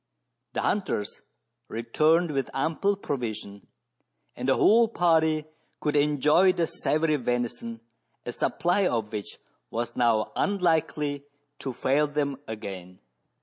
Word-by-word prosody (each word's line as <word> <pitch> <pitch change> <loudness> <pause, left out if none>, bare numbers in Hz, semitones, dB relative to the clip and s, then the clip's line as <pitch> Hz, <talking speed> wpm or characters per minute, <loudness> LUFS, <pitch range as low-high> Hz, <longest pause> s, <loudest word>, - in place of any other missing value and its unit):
The - - -1
hunters 185 - -1 0.5
returned 155 +9 +2
with 135 -2 -1
ample 165 +8 +1
provision, 110 - -5 0.7
and - - -2
the - - +5
whole 230 +2 +5
party 160 -6 +2 0.3
could 150 - -1
enjoy 150 +5 +4
the 170 - +1
savoury 155 -1 0
venison, 120 -2 -3 0.4
a 120 - -3
supply 180 +9 +1
of 110 -6 -1
which 105 -2 -5 0.3
was 120 +1 -3
now 115 -3 +2
unlikely 155 -7 0 0.3
to 135 - -3
fail 140 +4 +1
them 145 -2 -1
again. 95 -4 -7
145 Hz, 115 wpm, -27 LUFS, 115-160 Hz, 0.7 s, the